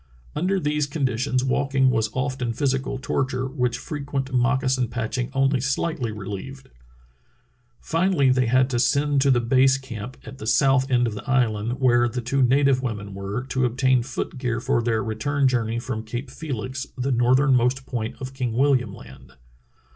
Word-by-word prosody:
Under 190 +4 +1
these 150 -2 0
condi 135 -5 -1
tions 130 0 0
walking 135 0 +2
was 110 -2 0
often 130 -2 -2
physical 135 +1 -1
torture, 130 -1 -1
which 125 -3 -1
fre 150 - -6
quent 140 -1 -3
moccasin 130 0 +1
patching 120 +1 -3
only 135 0 +2
sHghtly 135 -1 -1
relieved. 105 +7 -7 1.1
Fi 165 +3 0
nally 140 -9 +3
they 130 -1 +2
had 130 +2 +3
to 120 - 0
send 145 +2 +2
to 140 - +3
the 125 -2 +4
base 130 +3 +3
camp 125 -2 -8
at 135 - -10
the 110 - -6
south 135 +4 +3
end 125 -1 +3
of 115 - -2
the 105 +6 -8
island, 115 -4 +1
where 120 -2 +3
the 125 - -4
two 130 +3 0
native 135 +1 +3
women 105 -5 -4
were, 100 +5 -4
to 130 -1 0
obtain 125 +1 +2
foot 125 +2 -5
gear 125 -3 -1
for 120 0 +1
their 115 -2 0
return 140 +6 0
journey 115 -3 0
from 120 -2 -4
Cape 120 +4 -6
Felix, 130 -2 -5
the 130 +2 -1
northernmost 130 +1 +3
point 115 -3 -4
of 130 0 -6
King 125 -4 -2
William 125 -5 +2
Land. - - -14
130 Hz, 175 wpm, -24 LUFS, 120-135 Hz, 1.1 s, the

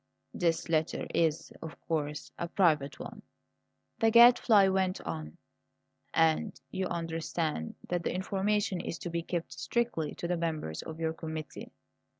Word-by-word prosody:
"This 165 -2 0
letter 160 -1 0
is, 160 -2 +1
of 160 - -8
course, 150 -2 -3
a 170 - -2
private 160 -7 +2
one," - - -8 0.8
the 225 - +4
Gadfly 235 -3 +7
went 190 -1 +1
on; 80 -2 -6 0.7
"and 165 +6 +2
you 185 0 -1
understand 165 - -2
that 175 -1 -1
the - - -1
information 195 0 0
is - - -4
to 175 - -6
be 170 0 -1
kept 170 0 -4
strictly 230 -11 -1
to 170 - -4
the 175 0 0
members 155 - -3
of 160 0 -8
your 160 -1 0
committee." 160 -2 -7
165 Hz, 145 wpm, -30 LUFS, 155-190 Hz, 0.8 s, Gadfly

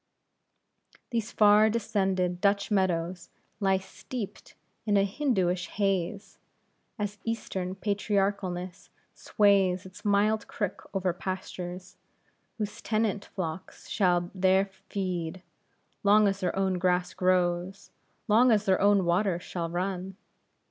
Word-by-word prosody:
These 230 -1 -2
far 210 +1 +6
descended 190 -5 0
Dutch 200 +2 +2
meadows 180 -2 0 0.3
lie 195 -2 +3
steeped 205 +3 -8 0.3
in 205 -2 +2
a 195 - +4
Hindooish 190 -7 0
haze; 195 0 -2 0.6
an 210 -2 0 0.2
eastern 190 -5 -3
patriarchalness 195 -3 -2 0.2
sways 195 -3 +2
its 185 +2 -12
mild 210 +1 +2
crook 205 -5 -4
over 185 -2 +1
pastures, 185 0 -6 0.6
whose 210 0 -4
tenant 215 -2 0
flocks 170 -2 -6
shall 175 -3 +1
there 190 +1 +2 0.2
feed, 185 -2 -3 0.6
long 205 +1 +5
as 195 0 0
their 180 -3 -1
own 190 -1 0
grass 180 0 +1
grows, 180 +1 0 0.4
long 235 +4 +5
as 215 -2 +3
their 190 -1 +2
own 200 -2 +4
water 175 +1 +1
shall 170 -1 -4
run. 185 +2 -3
190 Hz, 115 wpm, -28 LUFS, 180-205 Hz, 0.6 s, far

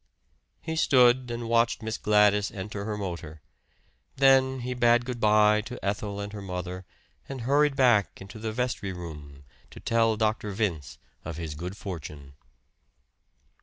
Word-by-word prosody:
He 160 - -3
stood 125 -4 +4
and 120 0 -4
watched 115 0 +1
Miss 110 0 -4
Gladys 105 -1 +3
enter 100 0 -6
her 105 -1 -3
motor. 85 -6 -6 0.7
Then 130 -1 +4
he 125 +1 -3
bade 120 0 +3
good 125 -2 -5
by 105 0 +4
to 120 +3 -8
Ethel 100 0 -2
and 100 0 -6
her 105 - -6
mother, 90 -1 -6 0.4
and 135 -2 -6
hurried 140 +3 +2
back 120 -7 +3
into 100 +3 -10
the 110 0 -3
vestry 115 -4 -2
room 75 -5 -9 0.3
to - - -12
tell 115 -1 +1
Dr. 110 -1 0
Vince 95 - -3 0.3
of 80 -2 -6
his 80 -3 -5
good 90 +6 -7
fortune. 75 -8 -8
105 Hz, 150 wpm, -27 LUFS, 95-120 Hz, 0.7 s, stood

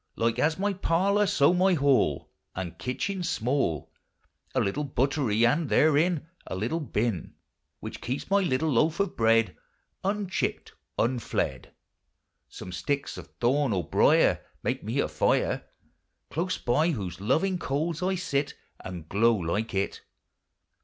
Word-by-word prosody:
Like 115 +1 0
as 155 +4 +2
my 200 +1 0
parlour, 195 +3 +2
so 145 -1 +4
my 185 +1 +3
hall 140 -3 +2 0.2
Ami 90 -2 -3
kitchen 185 +10 -2
's 170 - -2
small; 125 - -1 0.6
A - - +3
little 120 +10 0
butterie, 130 -4 +1
and 145 +6 +2
therein 155 +1 +3 0.2
A - - -4
little 115 - -1
hyn. 105 -5 -1 0.5
Which - - -7
keeps 130 +3 -3
my 200 - +5
little 160 -4 +1
loafe 155 +8 +2
of 200 -2 0
bread 115 -3 +3 0.5
Unchipt, 195 -1 -2 0.3
unflead. 115 - -1 0.8
Some 90 - -9
sticks 140 +12 -2
of - - -10
thorn 130 0 +2
or 90 -5 -2
briar - - +4 0.2
Make - - -1
me - - -3
a - - +2
fire, - - +1 0.7
Close 180 +3 -1
by 150 +8 +2
whose 95 - -4
loving 180 - +1
coals 155 +4 -2
I 190 +1 +1
sit, 150 -6 -1 0.2
And 90 -4 -8
glow 115 +5 +3
like 105 +4 -2
it. 95 +1 -1
140 Hz, 140 wpm, -27 LUFS, 115-170 Hz, 0.8 s, my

